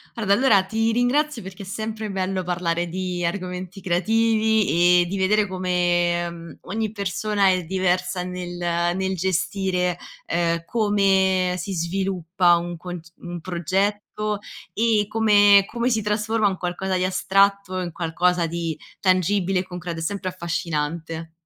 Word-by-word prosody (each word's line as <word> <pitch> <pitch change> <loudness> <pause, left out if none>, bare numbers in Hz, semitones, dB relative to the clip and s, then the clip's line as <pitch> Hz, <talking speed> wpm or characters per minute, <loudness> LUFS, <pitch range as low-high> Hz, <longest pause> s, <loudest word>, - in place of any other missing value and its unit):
Guarda, 205 -4 +1
allora 210 -5 +4
ti 225 +3 0
ringrazio 250 +3 +1
perché 190 +1 -9
è - - -10
sempre 215 +1 -4
bello 190 -1 -2
parlare 175 -1 -1
di 180 0 -3
argomenti 185 +1 -4
creativi, 210 -2 +3
e 175 - +1
di 195 +2 -3
vedere 205 +2 +2
come, 175 -2 0
mhmm, 170 0 -10
ogni 215 +1 -3
persona 200 0 0
è 185 -1 +1
diversa 180 0 0
nel 180 -1 -6 0.4
nel 190 0 -1
gestire, 180 0 0 0.3
uhm, 170 0 +1
come 190 -3 +2
si 190 +2 -4
sviluppa 180 0 +1
un 175 0 -5
conc 175 -1 -8
un 175 0 -7
progetto, 200 +4 -2 0.3
e 220 -2 +2
come 205 -2 +5
come 235 +3 -1
si 225 -3 +1
trasforma 210 +1 +1
un 190 -2 -1
qualcosa 185 +1 -2
di 180 - 0
astratto 195 0 +2
in 175 -2 -3
qualcosa 175 +1 0
di 165 -1 -3 0.2
tangibile 185 0 +2
e - - -1
concreto. 180 -2 -6
È - - -4
sempre 190 +1 -2
affascinante. 165 -2 -3
185 Hz, 140 wpm, -23 LUFS, 175-205 Hz, 0.4 s, come